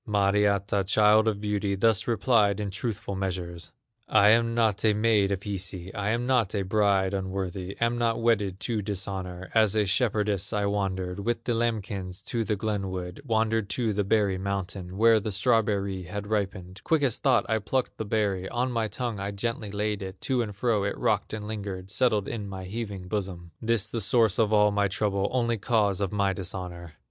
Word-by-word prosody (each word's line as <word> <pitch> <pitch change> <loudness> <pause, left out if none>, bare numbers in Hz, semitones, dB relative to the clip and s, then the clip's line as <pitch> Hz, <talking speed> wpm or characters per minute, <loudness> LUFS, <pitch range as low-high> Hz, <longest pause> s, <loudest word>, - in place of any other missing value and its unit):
Mariatta, 100 -1 +2
child 105 +2 +4
of 105 -2 0
beauty, 105 -1 -1
Thus 110 +1 +2
replied 110 -3 +2
in 100 -2 -3
truthful 100 0 -4
measures: 90 -3 -4 0.4
"I 105 -1 +5
am 115 +1 +3
not 110 -3 +2
a 110 -2 +4
maid 105 -2 +3
of 100 -1 -1
Hisi, 95 -2 -5
I 100 0 -2
am 120 +2 0
not 120 -7 +1
a 100 - 0
bride 100 -1 +2
unworthy, 95 -1 -4
Am 115 +1 +1
not 115 -1 +1
wedded 105 -5 +1
to 115 -3 -1
dishonor; 95 -2 -5
As 110 -2 +4
a 105 -1 +3
shepherdess 105 -2 0
I 105 -1 +1
wandered 95 -2 -2
With 115 +3 -2
the 120 - 0
lambkins 100 -5 -2
to 120 -3 0
the 105 0 -1
glen 105 -2 -2
wood, 90 +3 -6
Wandered 110 -3 0
to 115 -4 0
the 105 +1 0
berry 100 -2 +1
mountain, 95 -1 -4
Where 115 +1 +5
the 105 +1 -4
strawberry 100 -3 +1
had 100 +3 -6
ripened; 95 -3 -3
Quick 160 -3 +2
as 125 -5 +1
thought 130 -3 +3
I 110 0 +1
plucked 125 +5 -2
the - - -1
berry, 100 -3 0
On 125 +1 -1
my 115 -2 0
tongue 120 -2 -3
I 100 0 -3
gently 110 +1 -3
laid 105 0 -2
it, 95 0 -7
To 130 -2 +1
and 105 -3 -4
fro 105 -1 +1
it 100 - -2
rocked - - 0
and 110 -1 -5
lingered, 100 -3 -5
Settled 110 -6 +2
in 105 -4 -4
my 95 -1 -6
heaving 100 -2 -5
bosom. 90 -4 -4
This 115 -2 +1
the 115 0 -3
source 110 +1 +3
of 110 -2 +3
all 105 -1 +5
my 100 0 +2
trouble, 100 0 0
Only 115 -3 0
cause 105 -4 +1
of 100 - -1
my 100 -2 +1
dishonor!" 90 -3 -6
105 Hz, 195 wpm, -27 LUFS, 95-110 Hz, 0.4 s, I